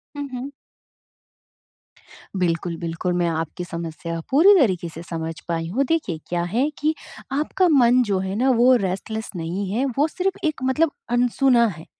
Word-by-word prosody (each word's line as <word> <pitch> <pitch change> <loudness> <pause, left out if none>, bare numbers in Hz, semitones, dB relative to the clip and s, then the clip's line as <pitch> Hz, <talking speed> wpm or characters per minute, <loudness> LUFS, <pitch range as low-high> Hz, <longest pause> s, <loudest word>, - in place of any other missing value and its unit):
हुँ, 285 -1 -4
हुँ। 255 +3 -5 1.9
बिल्कुल, 170 -1 -1
बिल्कुल 170 +2 -3
मैं 175 - +2
आपकी 165 +1 -3
समस्या 165 0 -5
पूरी 330 +10 +7
तरीके 185 - +1
से 165 0 -9
समझ 165 -1 -3
पाई 165 -1 -2
हूँ। 250 +10 +1
देखिए 200 - 0
क्या 175 -1 -1
है 270 +5 +2
कि 310 +1 +1 0.5
आपका 360 +4 +1
मन 245 +1 +5
जो 190 - +2
है 190 +1 -3
ना 255 +5 +2
वो 255 +1 +6
रेस्टलेस 220 +4 -4
नहीं 180 +4 -3
है, 240 +6 0
वो 290 +3 +3
सिर्फ़ 375 +4 -2
एक 305 -4 -3
मतलब 290 +5 +2 0.3
अनसुना 245 0 +3
है। 160 - -11
200 Hz, 160 wpm, -22 LUFS, 170-270 Hz, 1.9 s, पूरी